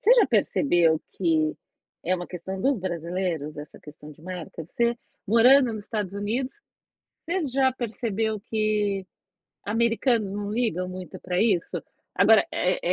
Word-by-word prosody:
você 480 +5 +6
já 485 - +5
percebeu 170 - +3
que 160 -4 +1 0.5
é 185 +2 +2
uma 175 0 -6
questão 190 +2 -6
dos 270 +1 +2
brasileiros 170 -3 -3
essa 150 - -9
questão 150 0 -12
de 155 - -19
marca? 175 -2 -7
Você 235 0 +1 0.3
morando 240 +2 +6
nos 210 -1 -7
Estados 205 -4 -3
Unidos, 230 +6 -2 0.7
você 340 -1 -1
já 265 0 +2
percebeu 225 -3 -2
que 210 -3 0 0.6
americanos 230 -1 +1
não 205 0 -4
ligam 210 -6 0
muito 185 -3 -8
pra 180 0 -1
isso? 200 -6 +2 0.5
Agora, - - +6
eh - - 0
205 Hz, 140 wpm, -25 LUFS, 180-235 Hz, 0.7 s, você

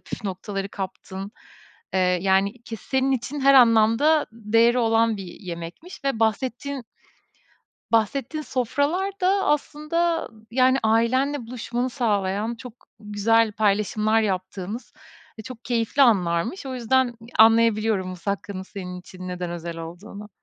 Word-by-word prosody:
püf 215 - -8
noktaları 195 +1 -4
kaptın. 190 0 -7 0.6
Eee, 190 - +3 0.2
yani 195 +4 +1
ki 230 - -7
senin 265 +4 0
için 265 +3 -3
her 275 0 +5
anlamda 240 +5 +5
değeri 230 +2 +3
olan 225 -1 +2
bir 195 - -7
yemekmiş 175 - -9
ve 270 -5 -1
bahsettiğin 250 +4 -1 1.1
bahsettiğin 255 +7 0
sofralar 290 - -1
da 390 +2 +2
aslında, 320 +3 0
ı 220 -1 -20
yani, 260 +2 +4
ailenle 240 +5 +1
buluşmanı 245 +1 -3
sağlayan 215 -2 -1
çok 235 0 -10 0.3
güzel 215 +2 +2
paylaşımlar 215 +1 +1
yaptığınız 190 +2 -4 0.5
ve 220 - -7
çok 245 0 -10
keyifli 235 +3 0
anlarmış. 200 - +2
O 260 -1 -4
yüzden 255 +2 +2
ı 240 - -8 0.3
anlayabiliyorum 220 -3 +4
musakkanın 190 +1 -4
senin 180 -2 -7
için 185 0 -10
neden 180 -1 -4
özel 170 -1 -6
olduğunu. 200 +6 -9
225 Hz, 125 wpm, -24 LUFS, 200-255 Hz, 1.1 s, her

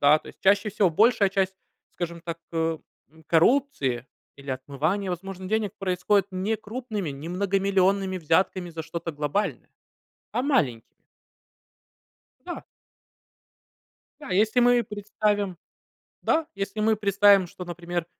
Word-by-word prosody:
Да, 145 +2 +6
то - - -14
есть - - -14
чаще 205 +2 +4
всего, 195 -3 +2
большая 215 +2 +4
часть, 190 -1 0 0.4
скажем 170 -1 -4
так, 165 0 -5
э, 165 -1 0 0.3
м, 160 0 -21
коррупции 165 - +2 0.3
или 140 0 -8
отмывания 150 +9 -1
возможных 185 +1 -6
денег 215 -2 0
происходит 195 +1 +1
не 195 +4 -1
крупными, 215 - -5
не 140 +4 -7
многомиллионными 195 0 +1
взятками 175 +2 +1
за 160 0 -6
что-то 165 +1 -5
глобальное, 150 +8 -2 0.6
а 245 - 0
маленькими. 145 - 0 1.4
Да. - - -6 1.6
Да, - - -9
если 215 +6 +3
мы 245 0 +5
представим 205 -2 -1 0.7
да, 320 -1 +2
если 200 +2 -4
мы 220 0 +3
представим 200 -2 +5
что, 180 +2 -9
например, 175 0 -4
190 Hz, 125 wpm, -26 LUFS, 165-205 Hz, 1.6 s, Да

